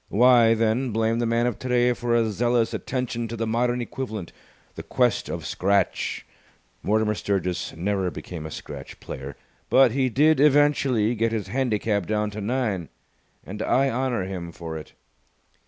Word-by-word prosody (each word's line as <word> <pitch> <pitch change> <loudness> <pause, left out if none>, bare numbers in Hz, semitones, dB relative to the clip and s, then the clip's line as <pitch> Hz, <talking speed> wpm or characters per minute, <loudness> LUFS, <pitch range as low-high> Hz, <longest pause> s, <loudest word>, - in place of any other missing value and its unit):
Why, 120 0 +5
then, 115 +3 +1
blame 110 +1 +1
the 120 - 0
man 115 +1 +1
of 120 -3 -2
today 125 -1 +2
for 120 0 -1
a 115 -2 +2
zealous 120 +2 +1
attention 125 -3 -3
to 115 - -5
the 115 - -1
modern 120 +2 0
equivalent, 110 -7 -5 0.4
the - - -7
Quest - - 0
of - - -5
Scratch! 100 0 0 0.6
Mortimer 110 +1 +1
Sturgis 95 -3 -2
never 95 +2 -1
became 85 -2 -7
a - - -8
scratch - - -9
player, 70 +1 -7 0.3
but 130 -2 +6
he 130 +1 +1
did 150 +6 +3
eventually 140 -6 +3
get 115 0 0
his 105 -4 -3
handicap 110 -5 0
down 105 -1 0
to 105 +1 -6
nine, 105 -6 -1 0.6
and 105 +3 -7
I 135 +3 +2
honour 125 -4 -1
him 90 -2 -5
for 80 -1 -7
it. 80 - -9
115 Hz, 160 wpm, -24 LUFS, 100-125 Hz, 0.6 s, but